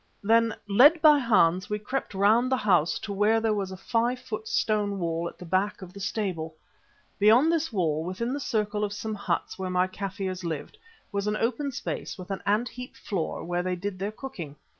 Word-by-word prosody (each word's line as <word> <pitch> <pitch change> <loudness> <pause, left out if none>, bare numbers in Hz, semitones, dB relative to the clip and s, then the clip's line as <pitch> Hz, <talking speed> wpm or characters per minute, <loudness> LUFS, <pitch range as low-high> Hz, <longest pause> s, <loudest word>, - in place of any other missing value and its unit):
Then, 225 +1 +3
led 275 +11 +6
by 300 -2 +7
Hans, 185 -6 +3
we 210 - 0
crept 210 0 -4
round 220 +6 +3
the 260 - +3
house 170 -8 +2
to 205 - -5
where 210 +3 +3
there 225 -1 +1
was 200 -2 -2
a 190 - -7
five 235 +5 0
foot 220 -4 -6
stone 205 -2 0
wall 170 -1 -2
at - - -17
the 180 - -10
back 190 +3 0
of 180 -1 -11
the 200 - -10
stable. 180 -6 -3 0.6
Beyond 230 +10 +6
this 325 -2 0
wall, 160 -7 0
within 205 +8 -3
the 285 - -2
circle 210 -5 -1
of 205 -1 -2
some 220 +1 -4
huts 200 -1 -3
where 190 -1 -3
my 180 0 +2
Kaffirs 185 -1 -4
lived, 165 - -5 0.3
was 200 0 -2
an 210 0 0
open 255 +6 -1
space 240 - -5
with 185 +1 -8
an 195 - -3
ant 215 +4 +2
heap 250 +1 -9
floor 180 -6 -3
where 175 +1 -1
they 180 0 -1
did 185 +1 -5
their 200 +2 -2
cooking. 215 - -8
205 Hz, 205 wpm, -27 LUFS, 185-230 Hz, 0.6 s, by